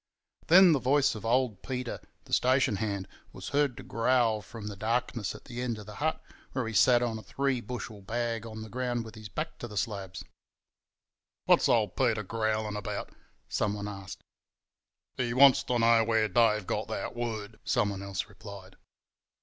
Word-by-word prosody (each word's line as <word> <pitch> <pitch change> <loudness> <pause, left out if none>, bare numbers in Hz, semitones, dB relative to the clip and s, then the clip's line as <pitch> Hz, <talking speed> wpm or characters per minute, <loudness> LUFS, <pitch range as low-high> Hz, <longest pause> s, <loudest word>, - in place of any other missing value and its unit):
Then 180 +2 +8
the 150 - +3
voice 140 +3 +3
of 110 -3 -8
old 120 -4 +1
Peter, 125 -2 -4 0.3
the - - -10
station 130 -4 +3
hand, 100 -2 -2 0.2
was - - -8
heard 140 -4 +1
to - - -8
growl 120 -2 +2
from 110 0 -10
the 105 -1 -5
darkness 115 0 -1
at - - -13
the 120 0 -6
end 120 -3 -2
of 105 - -9
the 105 - -9
hut, 160 +1 0 0.3
where 130 -4 -1
he 115 - -4
sat 120 +2 +5
on 115 -2 -2
a - - -9
three 135 +4 -1
bushel 110 -3 -6
bag 115 +2 -2
on 110 -1 -7
the 110 - -9
ground 120 -1 -2
with 110 - -10
his 110 -2 -10
back 160 +6 -5
to 120 - -5
the 105 -2 -8
slabs. 95 -2 -3 1.2
"What's - - +4
old - - +2
Peter 105 -1 +1
growlin' 110 0 -1
about?" 105 - -5 0.4
someone 105 -1 -1
asked. 95 -2 -8 0.9
"He 120 -1 -1
wants 135 0 +7
to 125 - 0
know 115 0 +5
where 110 -1 +2
Dave 105 -1 +3
got - - -2
that - - -4
word," 110 -3 -4
someone 100 -5 0
else 100 -1 -3
replied. 100 -2 -12
115 Hz, 180 wpm, -29 LUFS, 105-125 Hz, 1.2 s, Then